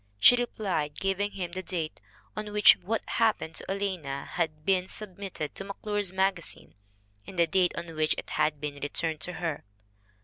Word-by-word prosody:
She 110 - +9
replied, 195 -11 -1
giving 195 +1 0
him 185 -4 -4
the 185 +2 -3
date 165 -4 -3 0.4
on 210 0 -4
which 210 -1 +9
What 225 +3 -2
Happened 220 -8 +1
to - - -6
Alanna 185 -9 -2
had 155 -3 -2
been 185 -1 +3
sub 200 -3 -7
mitted 185 -7 -4
to - - -7
McClure' 205 +1 -3
s 200 -3 +1
Magazine 190 -2 -1 0.5
and 185 - -9
the 170 - +6
date 180 0 +2
on 165 -1 -5
which 155 0 +2
it - - -6
had 150 -1 +1
been 145 -1 -4
returned 155 +2 0
to 180 - -2
her. 165 -4 -3
180 Hz, 180 wpm, -29 LUFS, 155-200 Hz, 0.5 s, She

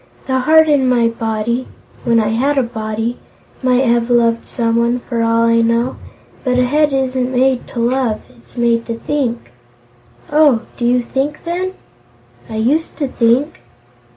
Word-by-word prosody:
The 260 -1 0
heart 315 +4 +5
in 280 -4 +3
my 235 -2 +3
body 230 +2 -2 0.4
when 230 -1 +3
I 215 -1 +1
had 270 +6 0
a 270 - +3
body 225 0 -4 0.4
might 255 0 +2
have 235 0 +1
loved 235 -1 +2
someone, 235 +1 0
for 235 -2 -3
all 230 0 +2
I 230 0 +3
know, 230 +2 +1 0.5
but 250 -2 +1
a 250 - +4
head 295 +3 +2
isn't 260 -1 -1
made 260 0 +1
to 240 - -6
love; 240 -2 0
it's 120 - -22
made 235 -1 +1
to 230 - -3
think." 240 - -3 0.8
"Oh; 290 -6 +4
do 240 - -3
you 245 0 +2
think, 275 +5 -3
then?" 360 +2 -3 0.8
"I 220 - -6
used 270 +9 0
to 285 - -1
think." 255 +7 +1
245 Hz, 160 wpm, -16 LUFS, 230-265 Hz, 0.8 s, heart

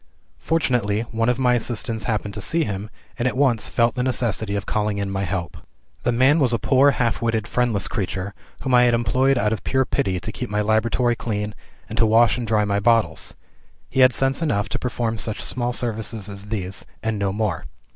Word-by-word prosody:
Fortunately 120 -10 +1
one 115 +1 +1
of 125 - +1
my 125 -2 +3
assistants 115 -2 -2
happened 105 -3 -2
to - - -5
see 165 0 +2
him, 105 -4 -4 0.3
and 120 - +1
at 130 - -2
once 130 -6 +2
felt 115 -1 +2
the 125 - -2
necessity 110 -5 0
of 100 -1 -3
calling 105 0 -1
in 100 -1 -2
my 95 0 -1
help. 90 -1 -4 0.4
"The 120 - +1
man 130 +6 +4
was 130 -5 +3
a - - +3
poor 130 +6 +4
half 120 -5 0
witted 110 -3 0
friendless 115 -6 +1
creature, 95 -1 -3 0.3
whom 130 - -1
I 125 0 +6
had 120 -1 +4
employed 130 +4 +2
out 105 -1 +1
of 110 - -5
pure 130 0 +1
pity 95 -5 -1
to 110 - -5
keep 125 +1 -5
my 105 0 0
laboratory 115 +3 +2
clean, 105 -2 -3 0.3
and 110 +2 -5
to 115 - +5
wash 115 +1 +4
and 120 - -4
dry 105 -1 +2
my 100 0 0
bottles. 115 +1 +1 0.6
He - - -1
had 130 0 +7
sense 135 +4 0
enough 105 -11 0
to - - -2
perform 115 -2 -2
such 105 +1 -3
small 120 -1 -2
services 110 -3 -2
as 100 0 -7
these, 100 -3 -4 0.2
and 110 -2 -1
no 100 -1 0
more. 105 -2 -2
115 Hz, 210 wpm, -22 LUFS, 105-125 Hz, 0.6 s, had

